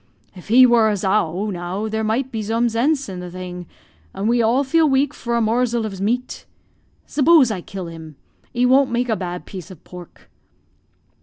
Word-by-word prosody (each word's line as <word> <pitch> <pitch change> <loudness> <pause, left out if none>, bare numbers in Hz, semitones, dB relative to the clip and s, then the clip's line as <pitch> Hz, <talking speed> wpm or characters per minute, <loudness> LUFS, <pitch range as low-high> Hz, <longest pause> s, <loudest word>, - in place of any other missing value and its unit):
If 180 -2 -14
he 250 +4 +7
wor 235 -3 +4
a - - +1
zow, 195 0 0
now, 180 +4 -4
there 220 0 -2
might 240 +5 -1
be 225 - -3
zome 230 +3 0
zenze 275 +5 0
in 185 -2 -7
the 180 0 -7
thing; 180 -1 -8 0.5
and 200 - -2
we 240 +1 +2
all 235 +5 +2
feel 315 +3 +2
weak 270 +1 +1
for 235 -4 -3
a - - +1
morzel 235 +1 0
of 195 -3 -6
meat. 245 +5 -2 0.6
S'poze 290 -4 +4
I 190 -4 -4
kill 190 +1 -7
him? 160 -2 -10 0.4
He 245 +1 +1
won't 265 +2 +4
make 245 +1 -1
a 220 - +2
bad 180 -2 -6
piece 185 -3 -9
of 185 -5 -13
pork." 180 -1 -13
220 Hz, 190 wpm, -20 LUFS, 185-250 Hz, 0.6 s, he